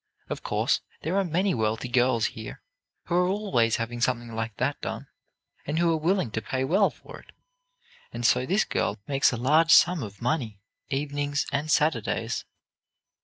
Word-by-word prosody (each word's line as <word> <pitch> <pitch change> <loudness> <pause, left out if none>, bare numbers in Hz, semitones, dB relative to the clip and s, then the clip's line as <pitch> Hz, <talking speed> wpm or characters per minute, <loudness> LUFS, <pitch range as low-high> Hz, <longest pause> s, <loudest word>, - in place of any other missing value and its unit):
Of - - -4
course, - - 0 0.2
there 165 +5 -1
are 200 - +3
many 185 +3 0
wealthy 110 +1 -1
girls 120 -2 +2
here 110 -1 -9 0.4
who - - -4
are 180 +1 +3
always 185 - +1
having 120 +1 -4
something 120 -1 -1
like 110 -1 -4
that - - -1
done, - - -5 0.6
and 150 +2 -1
who 170 0 +3
are - - +1
willing 170 - 0
to 110 - -2
pay 130 +4 -2
well 195 +9 +3
for - - -13
it. - - -18 0.8
And 120 - -4
so 125 +3 +3
this 200 +4 +2
girl - - -1
makes 135 -1 +3
a 120 - -3
large 155 +7 +3
sum 175 0 +6
of 100 -3 -8
money, 120 -5 -2 0.3
evenings 145 +1 -1
and 145 +2 -2
Saturdays. 150 -8 0
135 Hz, 170 wpm, -26 LUFS, 115-165 Hz, 0.8 s, sum